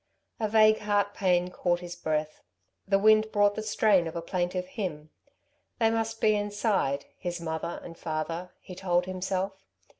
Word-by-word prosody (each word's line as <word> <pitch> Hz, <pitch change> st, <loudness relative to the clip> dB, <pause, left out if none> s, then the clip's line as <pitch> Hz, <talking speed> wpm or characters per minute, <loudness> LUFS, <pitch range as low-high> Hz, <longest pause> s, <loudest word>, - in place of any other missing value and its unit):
A 220 Hz, -, +1 dB
vague 215 Hz, 0 st, +5 dB
heart 205 Hz, -1 st, +1 dB
pain 180 Hz, -2 st, +1 dB
caught 175 Hz, -1 st, 0 dB
his 175 Hz, 0 st, -7 dB
breath. 155 Hz, -2 st, -2 dB, 0.5 s
The 195 Hz, 0 st, +4 dB
wind 215 Hz, +1 st, +4 dB
brought 205 Hz, -1 st, +4 dB
the 215 Hz, -, -4 dB
strain 210 Hz, -4 st, +3 dB
of 165 Hz, -, -7 dB
a 170 Hz, -, -2 dB
plaintive 180 Hz, 0 st, -2 dB
hymn. 170 Hz, -6 st, -5 dB, 0.7 s
They 225 Hz, -1 st, +3 dB
must 225 Hz, 0 st, -1 dB
be 215 Hz, -1 st, +4 dB
inside, 205 Hz, -, 0 dB
his 175 Hz, -1 st, -4 dB
mother 160 Hz, 0 st, -4 dB
and 165 Hz, -, -9 dB
father, 165 Hz, +2 st, -4 dB
he 185 Hz, -, -10 dB
told 180 Hz, -1 st, 0 dB
himself. 190 Hz, +1 st, -3 dB
185 Hz, 160 wpm, -28 LUFS, 175-210 Hz, 0.7 s, vague